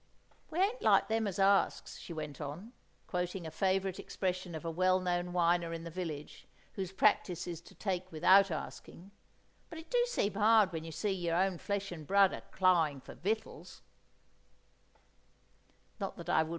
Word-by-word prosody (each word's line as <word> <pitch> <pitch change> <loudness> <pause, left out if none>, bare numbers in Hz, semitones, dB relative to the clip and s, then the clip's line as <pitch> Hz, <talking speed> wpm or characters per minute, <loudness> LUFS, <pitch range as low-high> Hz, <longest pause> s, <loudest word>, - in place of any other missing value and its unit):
'We 330 - -3
ain't 420 +6 +1
like - - +4
them 220 -1 +1
as 195 -1 -4
asks,'" 195 0 +2
she - - -10
went 155 -3 -6
on, 165 - -7 0.3
quoting 180 0 -3
a 160 - -6
favourite 190 +2 0
expression 185 -2 -3
of 160 - -7
a 165 - -1
well 185 +2 +3
known 180 -1 -1
whiner 170 -1 +2
in 165 0 -5
the 170 - -7
village, 160 -4 -6 0.3
whose 190 -2 -4
practice 185 -3 +2
is 170 -2 -6
to - - -17
take 185 -2 -3
without 190 +5 +5
asking, 170 +3 -7 0.6
"'but 330 - -8
it 320 - -11
do - - +4
seem 210 - 0
hard 215 -1 +4
when 160 -2 -4
you 165 - -7
see 165 +7 -1
yer 170 -3 -1
own 185 -1 +1
flesh 200 -1 -3
and 155 -4 -8
blood 195 -1 +5
a - - -6
crying 170 -7 +2
for - - -11
vittels. 215 +5 -4
185 Hz, 165 wpm, -33 LUFS, 170-195 Hz, 0.6 s, without